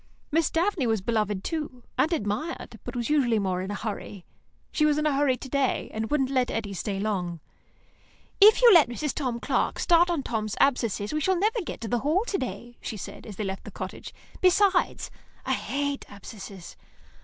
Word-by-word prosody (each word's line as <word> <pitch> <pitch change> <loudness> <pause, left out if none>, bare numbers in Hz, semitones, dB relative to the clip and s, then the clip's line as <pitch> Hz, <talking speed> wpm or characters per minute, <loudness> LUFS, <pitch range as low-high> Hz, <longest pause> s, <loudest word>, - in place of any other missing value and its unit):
Miss 325 +2 +2
Daphne 335 -5 +1
was 220 -1 +2
beloved, 210 -1 -1
too, 300 -7 -4
and 320 - +2
admired, 300 +3 -3
but - - -7
was 240 +3 -2
usually 255 -7 +3
more 185 -3 0
in 190 - -5
a 205 - -3
hurry. 205 -3 -6 0.5
She 305 - +1
was 300 -1 +4
in 305 - 0
a 300 - +3
hurry 275 -2 +2
to 265 - -8
day, 275 -1 0
and 220 0 -3
wouldn't 270 -3 +1
let 255 -2 +2
Eddy 210 -3 -3
stay 195 +1 -3
long. 185 -5 -2 1.0
"If 430 +4 +8
you 470 -3 +9
let 330 -8 +7
Mrs. 275 +3 -2
Tom 250 -5 -2
Clark - - 0
start 345 0 +4
on 330 -6 0
Tom's 215 -3 -2
abscess, 230 -5 +1
we 305 - 0
should 375 +2 +2
never 440 +4 +1
get 350 - -7
to 230 - -4
the 240 +2 0
Hall 315 - +1
to 400 - -1
day," 240 -1 -6
she 215 - -5
said, 200 - -8
as 210 - -8
they 215 - -3
left 195 -1 -4
the - - -8
cottage. - - -7 0.3
"Besides, 375 0 +3 0.3
I - - +1
hate 285 0 -2
abscesses." 200 -2 -10
255 Hz, 200 wpm, -27 LUFS, 210-305 Hz, 1.0 s, you